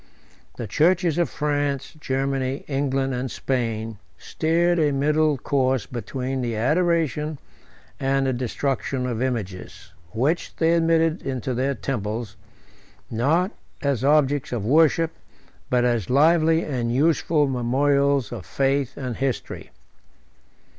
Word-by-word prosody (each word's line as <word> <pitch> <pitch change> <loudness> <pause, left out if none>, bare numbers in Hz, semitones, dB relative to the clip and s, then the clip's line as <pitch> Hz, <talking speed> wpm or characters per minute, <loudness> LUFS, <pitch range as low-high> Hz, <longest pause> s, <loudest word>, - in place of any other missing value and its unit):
The 120 - -4
churches 170 - +2
of 175 - +1
France, 145 -2 -2
Germany, 135 -1 -2
England, 135 -1 0
and 125 +1 -2
Spain, 115 -5 -2 0.2
steered 170 +2 +1
a 150 -2 +3
middle 150 +2 +2
course 130 -3 0
between 130 +2 -4
the 120 -2 -2
adoration 155 +2 +1 0.6
and 135 0 +1
the 130 - +1
destruction 130 +1 -2
of 120 -2 -2
images, 110 -8 -4 0.2
which 140 +10 -1
they 165 0 +2
admitted 165 0 +2
into 130 -1 -3
their 135 +3 0
temples, 110 -3 -4 0.8
not 155 - +1 0.3
as 140 -4 0
objects 145 -1 +2
of 115 -5 -2
worship, 160 +4 +3 0.6
but 125 -1 +2
as 120 -6 0
lively 160 +4 +4
and 120 -5 -2
useful 150 +2 +2
memorials 140 +1 +1
of 115 -6 -6
faith 135 +2 0
and 125 -4 -4
history. 135 -2 -3
135 Hz, 120 wpm, -23 LUFS, 125-150 Hz, 0.8 s, lively